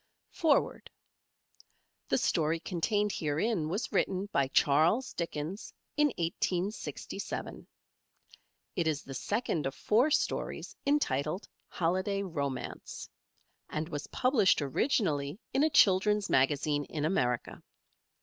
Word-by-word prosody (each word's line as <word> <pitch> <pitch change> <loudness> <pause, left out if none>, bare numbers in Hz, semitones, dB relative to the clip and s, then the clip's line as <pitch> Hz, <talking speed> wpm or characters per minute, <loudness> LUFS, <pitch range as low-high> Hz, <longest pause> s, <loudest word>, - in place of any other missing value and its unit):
FOREWORD 315 -4 +1 1.2
The - - +3
story 160 -1 +1
contained 205 +5 0
herein 155 +3 0
was 205 +7 -2
written 190 +1 +1
by 140 - +2
Charles 160 - +3
Dickens 170 +3 -4 0.2
in 300 0 +4
1867. 180 +4 -3 1.1
It 170 -2 0
is 150 -2 0
the 135 - -8
first 160 - -1
of 135 - -5
four 235 +8 +3
stories 305 - -1
entitled 180 - 0 0.2
"Holiday 190 +4 0
Romance" 140 -8 -4 0.6
and 155 +1 -3
was 145 -2 -5
published 250 -7 +3
originally 145 - 0
in 270 - +3
a 315 - +4
children's 205 -4 +4
magazine 145 +2 +2
in 150 -2 -3
America. 125 -8 0
170 Hz, 105 wpm, -31 LUFS, 150-210 Hz, 1.2 s, in